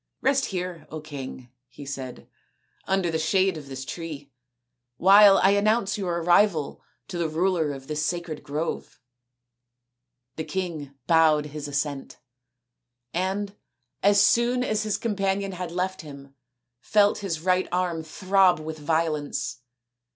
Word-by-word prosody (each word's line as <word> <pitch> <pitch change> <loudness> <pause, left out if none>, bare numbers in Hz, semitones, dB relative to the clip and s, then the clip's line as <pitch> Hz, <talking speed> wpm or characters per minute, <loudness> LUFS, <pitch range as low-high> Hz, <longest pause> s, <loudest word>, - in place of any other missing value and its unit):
" - - -56
Rest 270 0 +2
.here, 180 -4 -5
King/' 140 -5 -8 0.2
he 140 - -11
said, 135 -2 -7 0.3
" - - -40
under 190 -3 +1
the 160 - -1
shade 185 +3 +2
of 150 -3 -9
this 135 -1 -7
tree, 150 -4 -7 0.7
while 200 +3 +7
I 195 - +4
announce 205 0 +2
your 175 -4 -2
arrival 175 -3 +2 0.3
to 175 - -5
the 165 -2 0
ruler 165 -1 +1
of 135 -1 -8
this 150 +1 -2
sacred 170 -1 -3
grove/' 150 +3 -4 1.4
The 160 - -2
king 160 -7 -4
bowed 160 -3 +4
assent, 145 -1 -3 1.0
and 195 +3 -2 0.5
as 200 +1 +5
soon 240 +4 +3
as 215 -3 0
his 215 -2 -1
companion 195 -2 -1
had 180 -2 -5
left 185 +2 -2
him 140 -3 -12 0.5
felt 205 - +3
his 175 -6 -3
right 185 +1 +2
arm 175 -2 0
throb 185 +2 +2
with 155 0 -6
violence. 155 -4 -1
170 Hz, 135 wpm, -25 LUFS, 150-195 Hz, 1.4 s, while